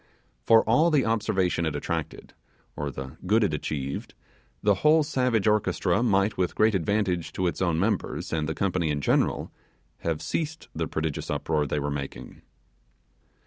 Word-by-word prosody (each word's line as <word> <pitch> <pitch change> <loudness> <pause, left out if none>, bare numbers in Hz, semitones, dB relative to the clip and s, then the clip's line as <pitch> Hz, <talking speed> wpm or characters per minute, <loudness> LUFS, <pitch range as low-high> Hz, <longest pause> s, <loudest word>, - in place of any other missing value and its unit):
For 115 - +5
all 150 +9 +4
the 150 -5 +3
observation 95 -6 +1
it 75 - -2
attracted, 75 - -4 0.4
or 75 -1 -3
the 65 +2 -8
good 110 +3 +4
it 95 - +1
achieved, 70 -2 -4 0.5
the 105 - +5
whole 155 +1 +5
savage 125 -8 +1
orchestra 105 +2 +2
might 100 -2 +2
with 90 -2 0
great 110 0 +4
advantage 95 -2 0
to 95 - -1
its 85 - -1
own 85 -3 +1
members 105 -2 -1
and 80 -1 -1
the 80 - -2
company 90 -4 0
in 75 -1 0
general, - - +1 0.5
have 80 -2 -2
ceased 155 0 -3
the 80 0 -2
prodigious 80 -2 -3
uproar 75 -2 0
they 75 - -2
were 70 0 -2
making. 70 -1 -6
95 Hz, 160 wpm, -26 LUFS, 80-110 Hz, 0.5 s, For